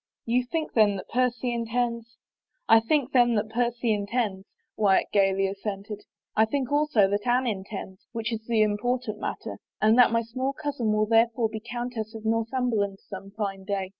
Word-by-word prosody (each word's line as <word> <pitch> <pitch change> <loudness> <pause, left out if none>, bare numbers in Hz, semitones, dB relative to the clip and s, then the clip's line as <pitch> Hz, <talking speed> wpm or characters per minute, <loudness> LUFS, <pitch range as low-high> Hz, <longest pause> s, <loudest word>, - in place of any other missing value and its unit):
" - - -66
You 245 +2 +2
think 315 +5 -3
then 210 -3 +4
that 190 - -8
Percy 250 0 0
intends 235 0 -2
—? - - -67
" - - -58
" - - -49
I 225 - +7
think 275 +4 0
then 240 -2 +4
that 215 0 -1
Percy 240 0 0
intends," 205 -2 -2 0.3
Wyatt 200 -3 +2
gayly 195 -1 +3
as 195 +1 -6
sented. 205 0 -5 0.2
" - - -63
I 220 - +5
think 260 +2 -2
also 290 -9 +3
that 205 +4 -2
Anne 250 +2 +3
intends, 195 -3 -5
which 230 -1 -3
is 220 -1 -4
the 225 -2 +3
important 215 +2 -1
matter, - - -5 0.2
and 220 +3 +4
that 245 - +8
my 230 0 +1
small 255 +4 -3
cousin 280 -7 -2
will 215 0 +2
there 225 +1 +5
fore 225 -2 +1
be 220 0 -5
Q)untess 240 -1 -5
of 220 - -8
Northimiberland 225 -3 0
some 195 0 -9
fine 195 -3 -3
day. 195 -1 -2
225 Hz, 200 wpm, -26 LUFS, 205-245 Hz, 0.3 s, that